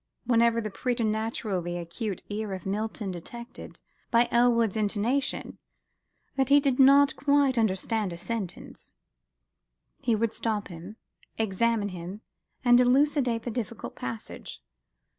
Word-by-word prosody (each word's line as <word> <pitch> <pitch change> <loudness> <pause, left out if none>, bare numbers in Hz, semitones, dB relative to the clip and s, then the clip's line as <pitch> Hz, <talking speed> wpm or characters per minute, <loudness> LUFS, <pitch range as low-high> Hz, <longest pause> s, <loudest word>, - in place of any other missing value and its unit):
Whenever 235 -1 +3
the 215 -2 -4
preternaturally 220 -6 -1
acute 175 +4 -5
ear 210 -1 -4
of 185 - -7
Milton 210 0 -3
detected, 235 +7 -9 0.3
by 235 +1 +4
Elwood's 235 -3 +3
intonation, 220 +6 -1 0.7
that 265 -1 0
he 285 +1 +7
did 275 -3 0
not 275 +1 +6
quite 280 -1 +3
understand 220 -1 0
a 170 - -6
sentence, 205 0 -6 1.1
he 240 -4 +1
would 225 +1 0
stop 215 -3 -2
him, 175 +4 -9 0.4
examine 220 0 +1
him, 185 +3 -7 0.4
and 245 0 +7
elucidate 250 -2 +3
the 240 - -3
difficult 230 -1 -5
passage. 120 -3 -7
225 Hz, 120 wpm, -27 LUFS, 200-245 Hz, 1.1 s, he